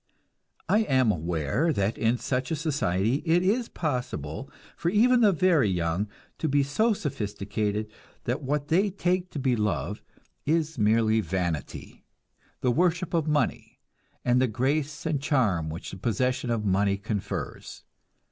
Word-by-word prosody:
I 210 - +4
am 130 - +3
aware 85 - 0
that 100 -5 0
in 115 +2 +1
such 130 +1 -2
a 165 - 0
society 130 - 0
it 170 +2 +3
is 225 +5 +1
possible 125 - -3 0.3
for 170 - -1
even 240 +6 +4
the 210 -3 +6
very 170 - +3
young 90 +2 0 0.3
to 160 - 0
be 140 +1 +3
so 215 +12 +2
sophisticated 105 - -3 0.3
that 125 +5 -2
what 145 +1 -2
they 195 +5 +3
take 180 -1 -1
to - - -7
be 130 -3 +1
love 100 - -1 0.4
is 160 -2 0
merely 110 +1 +3
vanity, 85 -7 -4 0.6
the 125 - +2
worship 175 +4 +1
of 165 -2 +1
money, 150 -4 -1 0.5
and 125 0 +3
the 130 - +3
grace 140 +6 -1
and 155 -4 0
charm 110 - +1
which 80 +3 -6
the - - -7
possession 125 +5 0
of 115 -2 -1
money 100 +1 +2
confers. 100 0 -5
130 Hz, 145 wpm, -27 LUFS, 105-160 Hz, 0.6 s, the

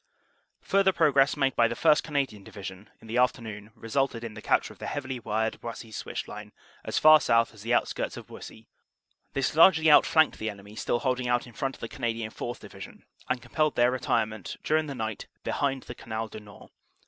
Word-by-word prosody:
"Further 195 -1 +3
progress 145 -5 +3
made 135 -3 +1
by 115 - +4
the 115 - -4
1st. 155 +2 +4
Canadian 135 -9 -2
Division 95 0 -9
in - - -15
the 115 +3 0
afternoon 110 -4 -1
resulted 115 +1 -1
in 115 -2 -6
the 110 - -9
capture - - +1
of - - -24
the - - -5
heavily 135 -3 -4
wired 110 0 -2
Buissy 115 -1 -8
Switch - - -5
line - - -9 0.3
as - - -3
far 155 0 +8
south 115 0 +2
as 110 - -14
the 115 +3 +1
outskirts - - -1
of - - -8
Buissy; - - -11 0.7
this 135 -1 0
largely 160 -1 +6
outflanked 155 +1 +5
the 110 - -2
enemy 100 0 -11
still 120 +1 -1
holding 125 -2 0
out 120 0 +1
in 120 - -14
front 135 +2 -3
of - - -19
the 115 - -4
Canadian 115 -3 -3
4th. 120 +2 -6
Division, 100 -1 -11 0.2
and 125 -1 -1
compelled 155 -2 0
their 120 +1 +4
retirement 110 -5 -2
dur 155 - +2
ing 155 -1 -1
the 140 - -5
night 110 -3 -4 0.2
behind 135 -2 -1
the - - -8
Canal 110 -1 -5
du 110 - -8
Nord. 105 -1 -15
120 Hz, 205 wpm, -27 LUFS, 110-135 Hz, 0.7 s, far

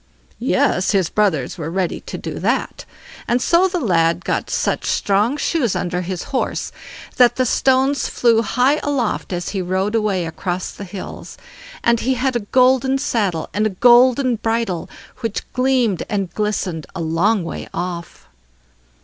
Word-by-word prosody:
Yes, 185 - +1
his 190 -4 +1
brothers 185 -7 0
were 160 0 -3
ready 180 +1 -1
to - - -7
do - - -6
that, - - -1 0.4
and 240 - +2
so 345 +8 +3
the 365 -1 -2
lad 170 - +1
got - - -1
such - - -1
strong 210 +7 +1
shoes 285 - 0
under 180 0 -2
his 185 0 -4
horse, 260 - -1 0.5
that 245 -1 +5
the 255 - +1
stones 265 +2 +2
flew 230 -2 +3
high 255 +6 +2
aloft 270 -10 -1
as 175 -1 -3
he 195 -2 -2
rode 190 +3 -1
away 210 -6 0
across 175 +3 -4
the 200 - -9
hills; 190 0 -8 0.5
and 235 -1 +3
he 260 +2 0
had 255 +1 0
a - - +2
golden 260 +1 +3
saddle 205 - -1
and 210 +2 +1
a 190 -4 -7
golden 250 +1 +5
bridle, 225 -6 -2 0.3
which 230 -4 -3
gleamed 250 -6 +1
and 195 -5 -2
glistened 195 -6 -2
a - - -4
long 170 +6 +1
way 165 - -6
off. 175 0 -6
215 Hz, 160 wpm, -19 LUFS, 180-250 Hz, 0.5 s, that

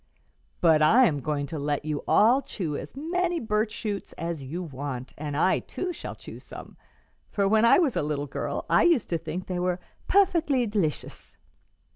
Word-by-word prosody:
But 160 -3 +5
I 230 +12 +6
am 145 -8 +1
going 145 +1 -2
to 150 +2 -5
let 145 +1 -2
you 150 -2 -3
all 240 +6 +5
chew 165 - -4
as - - -7
many 345 +4 -1
birch 215 -2 0
shoots 205 -3 -5
as 165 -3 -4
you 165 +7 -5
want, 135 -4 -6
and 145 -1 -4
I 185 +4 +3
too 360 -1 -5
shall - - -7
chew - - -11
some; - - -11 0.5
for 200 -1 +1
when 220 +2 +4
I 235 - +7
was 315 -8 +2
a - - +1
little 145 -1 -2
girl, 140 - -4
I - - +4
used 335 -10 +3
to 170 - 0
think 165 +3 -5
they 180 -1 -3
were 180 0 0 0.3
'puffickly 330 -10 +3
d'licious.'" 200 -8 -3
180 Hz, 185 wpm, -26 LUFS, 150-240 Hz, 0.5 s, I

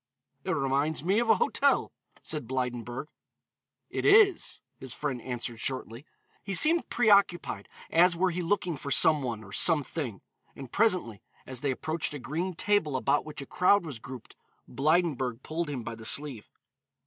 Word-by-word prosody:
"It - - -6
reminds 140 +3 0
me 195 +5 +2
of 235 -1 -1
a - - +7
hotel," 475 - +1 0.3
said 150 -7 -4
Blydenburg. 125 0 -3 0.9
"It - - -3
is," 405 -2 +4 0.2
his 130 -2 -8
friend 135 -5 -3
answered 120 -2 -4
shortly. 130 +1 -4 0.4
He 195 -1 -3
seemed 325 - +3
preoccupied 200 - +2 0.2
as 175 +1 +4
were 180 +2 +1
he 180 +1 -3
looking 175 -2 -1
for 140 - -7
some 155 +1 +4
one 115 -4 -4
or 100 - -13
something; 145 - +2 0.3
and 135 -3 -10
presently, 185 - +1 0.2
as 130 -2 -6
they 145 - -1
approached 155 +3 -2
a - - -3
green 170 +7 -4
table 195 -7 +1
about 140 +2 +1
which 150 -2 -7
a - - -11
crowd 180 +5 +3
was 140 -8 -7
grouped, 125 0 -11 0.3
Blydenburg 140 -5 0
pulled 165 0 -3
him 130 -5 -4
by 115 - -6
the 115 0 -11
sleeve. 130 -1 0
145 Hz, 160 wpm, -28 LUFS, 125-180 Hz, 0.9 s, a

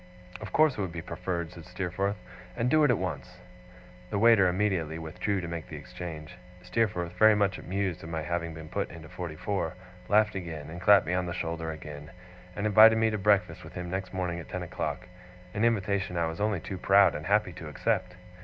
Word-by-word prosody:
'Of - - -7
course 155 -7 +3
it - - +1
would 95 -3 -2
be 85 -1 -6
preferred,' 85 0 -4
said 85 - -10
Steerforth. 95 +3 -2 0.4
'And 125 +1 +1
do 155 -1 +5
it 145 - +5
at 120 - +4
once.' 90 -5 -5 0.7
The 105 - -1
waiter 110 -3 +6
immediately 90 -4 0
withdrew 85 +5 -2
to 85 - -5
make 85 -1 -5
the - - -8
exchange. 80 -3 -8 0.2
Steerforth, 90 -3 -1
very 110 0 +7
much 100 -2 +1
amused 95 -2 -2
at 80 - -8
my 80 -1 -3
having 85 0 -3
been 80 0 -9
put - - -2
into 80 -2 -11
forty 85 -3 -6
four, 100 +5 -2 0.3
laughed 105 0 +4
again, 80 -5 -6
and 85 +1 -7
clapped 100 +1 +6
me 90 - -1
on 90 0 0
the 85 - -3
shoulder 80 -2 -3
again, 75 -1 -8 0.5
and 100 - -3
invited 110 +1 +8
me 110 0 +2
to 105 - -2
breakfast 100 0 +2
with - - -11
him 90 -1 -5
next 95 0 -3
morning 90 -2 -2
at 80 - -10
ten - - -4
o'clock - - -4 0.5
an 105 - -1
invitation 100 -5 +1
I 85 - +2
was 80 +3 -4
only 105 -5 0
too 95 +2 -6
proud 100 +1 +5
and 75 +2 -5
happy 105 -2 +2
to 80 - -8
accept. 90 +4 -1
90 Hz, 210 wpm, -29 LUFS, 85-105 Hz, 0.7 s, invited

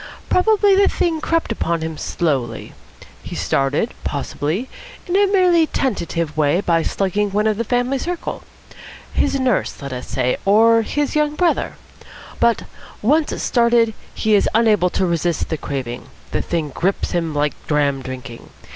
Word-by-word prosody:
Probably 410 +1 +4
the 400 +1 +5
thing 325 -3 0
crept 330 -6 0
upon 170 -6 -1
him 160 0 -4
slowly. 135 -8 -2 0.5
He - - -8
started, 140 - 0
possibly, 150 - -2 0.4
in 360 - -2
a 400 +1 +5
merely 360 -4 +4
tentative 170 - -2
way 155 +2 +2
by 170 -4 +2
slugging 200 +4 0
one 210 +2 0
of 215 -1 +1
the 230 - 0
family 245 +3 0
circle. 350 +4 -4 0.7
His 280 -1 +1
nurse, 255 -5 0
let 140 -2 -6
us 125 - -6
say, 125 -1 0
or 225 +3 +5
his 290 +7 -2
young 300 0 +1
brother. 350 +1 +1 0.7
But, 235 -2 +2 0.4
once 300 +7 +2
started, 235 -2 +3 0.2
he 215 - +1
is 205 - +4
unable 215 -5 +4
to 185 - 0
resist 170 -1 -1
the 160 - 0
craving. 130 -5 -5 0.2
The - - 0
thing 165 -3 -2
grips 185 +8 -1
him 165 -3 -1
like 145 0 +1
dram 145 -2 +1
drinking. 125 -2 -8
205 Hz, 155 wpm, -20 LUFS, -, 0.7 s, the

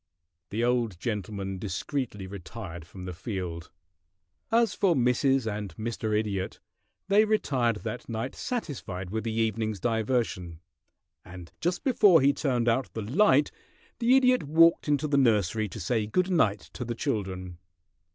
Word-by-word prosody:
The 110 +4 -1
old 120 -7 0
gentleman 100 -3 -4
discreetly 105 - -3
retired 90 -2 -8
from 90 +1 -10
the 90 - -5
field. 90 -3 -5 0.8
As 230 0 +3
for 190 -5 +2
Mrs. 130 0 +2
and 105 -5 -4
Mr. 110 -1 -1
Idiot, 100 -3 -2 0.5
they 200 +2 +5
retired 135 - +1
that 115 +1 -5
night 115 +3 -3
satisfied 100 - -5
with 110 +1 -2
the 115 - -1
evening's 110 -2 -1
diversion, 110 -7 -1 0.6
and 90 -1 -11
just 175 +2 -1
before 205 - +5
he 140 +1 +4
turned 125 -5 0
out 120 +3 +1
the 110 - -3
light 145 - +3 0.5
the 245 +2 +5
Idiot 255 -1 +4
walked 165 +3 +4
into 145 0 +1
the 140 -1 +2
nursery 110 -3 +2
to 110 - -8
say 110 +3 0
good 185 - +1
night 110 - +2
to 125 - -5
the 120 0 -4
children. 95 -5 -3
115 Hz, 145 wpm, -28 LUFS, 100-140 Hz, 0.8 s, they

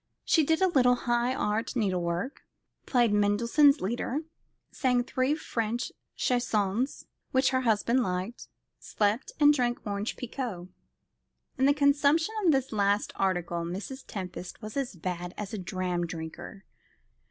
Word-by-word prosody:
She 320 - +4
did 320 +5 +2
a - - +6
little 250 -7 +4
high 240 +1 0
art 210 +2 -1
needle 195 -6 +1
work, 170 +9 -3 0.5
played 240 -5 +3
Mendelssohn's 235 +8 +4
Lieder, 240 +8 -2 0.5
sang 250 -3 +1
three 260 +4 0
French 235 -5 -2 0.2
chansons 240 0 0 0.2
which 260 0 +2
her 260 0 +1
husband 235 +2 +2
liked, 185 +2 -3 0.3
slept, 210 +4 -1
and 295 0 +7
drank 240 -4 -1
orange 205 +1 -3
pekoe. 230 -8 -5 0.9
In 265 - +4
the 285 - +5
consumption 290 +6 +3
of 345 - +5
this 270 -2 0
last 205 -1 +1
article 175 -3 0
Mrs. 200 +10 -6
Tempest 180 -2 -6
was 215 -1 -8
as 270 -7 -2
bad 175 +1 -5
as 210 -1 -5
a 215 - -3
dram 180 -1 -2
drinker. 165 +4 -8
230 Hz, 140 wpm, -28 LUFS, 195-260 Hz, 0.9 s, and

